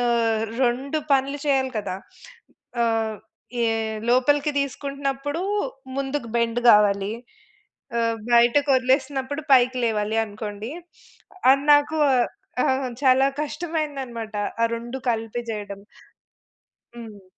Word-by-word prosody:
ఆహ్, 230 -2 +1 0.2
2 265 +5 0
పనులు 275 +1 +1
చేయాలి 265 -2 +1
కదా! 190 -3 -4 0.9
ఆహ్, 225 -1 0 0.4
యే 230 - +2 0.4
లోపలికి 290 +4 +3
తీసుకుంటున్నప్పుడు 280 +3 -3 0.5
ముందుకు 275 -3 -3
బెండ్ 235 0 +1
కావాలి. 200 0 +4 0.9
ఆహ్, 230 0 +1 0.2
బయటకొదిలేసినప్పుడు 265 +3 +2
పైకి 255 0 +5
లేవాలి 220 0 0
అనుకోండి. 210 +1 -7 0.8
అది 275 +1 +3
నాకు 290 +2 +2
ఆహ్, 250 -2 +3 0.5
ఆహ్, 260 -1 -2
చాలా 265 0 +5 0.2
కష్టమైందనమాట 285 -8 -4 0.3
ఆ - - +5
2 240 +3 -6
కలిపి 225 +1 -3
చేయడం. 205 -2 -6 1.1
హ్మ్. 220 -4 -11
250 Hz, 95 wpm, -23 LUFS, 225-275 Hz, 1.1 s, పైకి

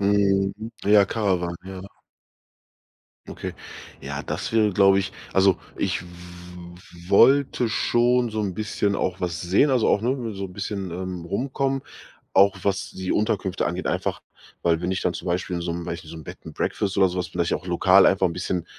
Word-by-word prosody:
Mhm. 100 -1 +2 0.3
Ja, 100 0 +6
Caravan, 90 -5 -1
ja. 95 -1 -8 1.5
Okay, - - -6 0.5
ja, - - -5
das - - -4
wäre, 110 -2 +3
glaube 95 0 +5
ich 95 - -2 0.2
also, 95 -1 +4 0.2
ich 95 -3 -1
w - - -13 1.0
wollte 125 +3 +4
schon 120 +2 +2
so 110 0 -2
'n 100 -3 -2
bisschen 105 -1 -1
auch 95 -1 -1
was 85 -4 -2
sehen, 95 +11 +3
also, 125 -4 +2
auch, - - +3
ne, 120 -2 -1
so 95 0 -5
'n 90 - -8
bisschen, 95 0 -4
ähm, 90 0 -5
rumkommen, 135 +7 -1 0.5
auch 100 0 +5
was 100 0 -1
die 95 0 -4
Unterkünfte 100 -4 0
angeht 90 +2 -4
einfach, - - -2 0.4
weil 85 -1 +2
wenn 90 - -1
ich 95 - -2
dann 85 - 0
zum 85 - -7
Beispiel 90 0 -1
in - - -4
so 85 0 -2
'nem 85 0 -5
ne, 85 -1 -4
so 80 0 -10
'nem 80 - -9
Bed - - -9
and - - -9
Breakfast 100 -1 -2
oder 95 -1 +5
so 90 - -5
was 90 - -2
vielleicht 85 -1 -1
auch 90 - -4
lokal 95 +2 +5
einfach 95 0 +3
'n 85 - +1
bisschen 90 -3 -3
95 Hz, 190 wpm, -24 LUFS, 90-105 Hz, 1.5 s, Ja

